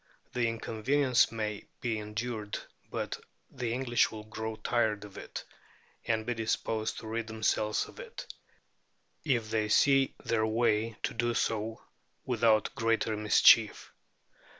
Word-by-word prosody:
The 120 -2 +1
inconvenience 120 +4 +2
may 105 -2 -3
be 115 -4 -1
endured, 105 0 -4 0.3
but - - -3 0.3
the 125 -4 -3
English 120 -1 +2
will 110 -1 -8
grow 110 +1 -5
tired 110 -2 0
of 100 - -13
it, - - -7 0.6
and 110 -1 +1
be 120 - 0
disposed 110 -1 -1
to 110 - -7
rid 115 0 -3
themselves 110 -1 0
of - - -14
it, 485 -2 -8 1.0
if 120 -7 0
they 110 -1 0
see 135 +4 +4
their 110 -1 +1
way 110 -1 +1
to - - -1
do 120 0 0
so 110 0 -1 0.4
without 110 -3 +2
greater 115 -1 +1
mischief. 105 0 +5
110 Hz, 130 wpm, -30 LUFS, 110-120 Hz, 1.0 s, mischief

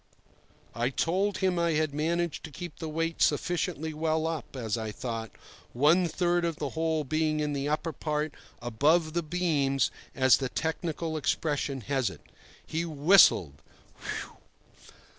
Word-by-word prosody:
I 120 +3 0
told 185 +8 0
him 185 -2 +1
I 170 -1 +2
had 155 -1 0
managed 165 +2 -1
to - - -8
keep 175 0 -8
the 160 - -4
weight 165 +1 -2
sufficiently 160 0 0
well 160 +1 0
up, 160 -4 -4
as 115 -4 -2
I 110 -2 -3
thought, 115 -1 -4 0.4
one 155 +8 +4
third 175 +1 +1
of 170 -2 0
the 145 -2 -3
whole 160 0 0
being 155 +2 0
in 150 -1 -1
the 140 0 -1
upper 155 +2 -1
part 150 +1 -2 0.3
"above 155 +8 +2
the 170 - +1
beams," 145 - +1 0.2
as 130 -2 +5
the 135 -2 -2
technical 160 +1 -2
expression 145 -3 -1
has 130 0 0
it. - - -12 0.4
He 165 +1 -2
whistled 150 - +5 0.4
"Phew!" - - -6
155 Hz, 150 wpm, -29 LUFS, 140-165 Hz, 0.4 s, as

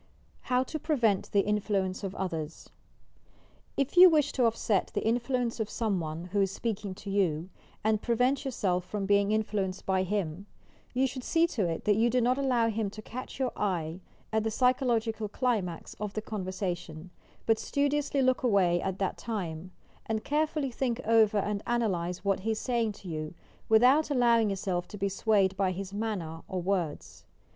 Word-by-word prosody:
HOW 250 0 +3
TO 310 +4 -5
PREVENT 235 - +1
THE 200 -1 +3
INTLUENCB 205 -2 -1
OP 190 - -6
OTHERS 165 -4 -4 1.1
If 275 +3 0
you 365 +1 +10
wish 300 -3 +3
to 250 - +2
offset 220 -3 +1
the - - -1
influence 240 +1 0
of 220 -1 -1
some 215 -5 -1
one, 160 0 -4
who 200 0 +2
is 195 - +2
speaking 205 -2 -3
to 200 +1 -7
you, 180 -3 0 0.3
and 215 0 +2
prevent 250 +4 +1
yourself 190 -9 -1
from 195 +2 -4
being 200 +1 +3
influenced 205 -3 -1
by 190 -1 +2
him, 190 -1 -2 0.5
you 260 +2 +3
should 255 -1 -4
see 330 +4 +3
to 220 - -1
it 165 - -4
that 210 -1 +3
you 230 +2 +3
do 250 +2 +2
not 250 +3 +2
allow 250 -4 +2
him 220 -2 -1
to 215 +2 -9
catch 255 +4 -7
your 260 -2 0
eye 175 -4 -2 0.3
at 220 -1 +2
the 220 - 0
psychological 230 -3 +1
climax 205 -8 -2
of 210 -1 -4
the 215 - -2
conversation, 185 -5 -4 0.3
but 225 -1 +3
studiously 285 -1 0
look 255 0 +2
away 190 -7 +3
at 190 -1 -2
that 195 -1 -2
time, 185 -6 -4 0.4
and 220 -1 -1
carefully 300 -2 0
think 245 -1 -1
over 220 -2 +4
and 205 0 -1
analyse 190 -6 -1
what 195 -1 +2
he 210 +4 -3
is 215 - -4
saying 235 -3 0
to 200 -2 -12
you, 155 0 -5 0.3
without 255 +8 +5
allowing 235 -5 +4
yourself 185 -2 -2
to 210 - -9
be 200 0 0
swayed 195 -1 +2
by 190 -1 +1
his 195 +1 -6
manner 195 -7 -3
or 185 - -3
words. 155 - -3
210 Hz, 180 wpm, -29 LUFS, 185-240 Hz, 1.1 s, you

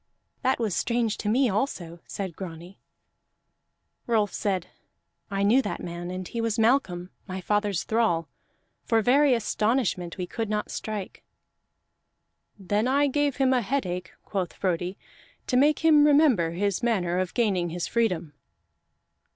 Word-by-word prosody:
"That 260 0 +2
was 220 -6 -1
strange 235 -2 0
to 210 - -2
me 255 +4 +3
also," 190 - -2
said 190 -5 -5
Grani. 175 0 -9 1.3
Rolf 215 -4 +1
said: 190 -4 -1 0.6
"I 195 -1 -1
knew 230 +7 +5
that 210 - -4
man, 175 0 -6
and 185 0 -5
he 230 - -3
was 230 -1 -1
Malcolm, 220 -7 +1 0.2
my 190 -1 -4
father's 205 -2 0
thrall. 220 -8 +1 0.6
For 225 -1 +2
very 270 +2 +5
astonishment 215 -5 0
we 180 - -2
could 225 +4 -4
not 210 0 -2
strike." 210 -3 -5 1.3
"Then 205 +4 0
I 280 +2 +3
gave 285 0 +1
him 265 -1 +3
a 250 - +2
headache," 185 -7 -2
quoth 190 -3 -3
Frodi, 180 0 -2 0.5
"to 250 - -1
make 295 +5 +3
him 305 -2 +7
remember 280 - +4
his 200 +3 -1
manner 185 -7 +1
of 185 -1 -3
gaining 195 -8 +1
his 170 +1 -3
freedom." 180 -10 0
210 Hz, 145 wpm, -26 LUFS, 180-245 Hz, 1.3 s, him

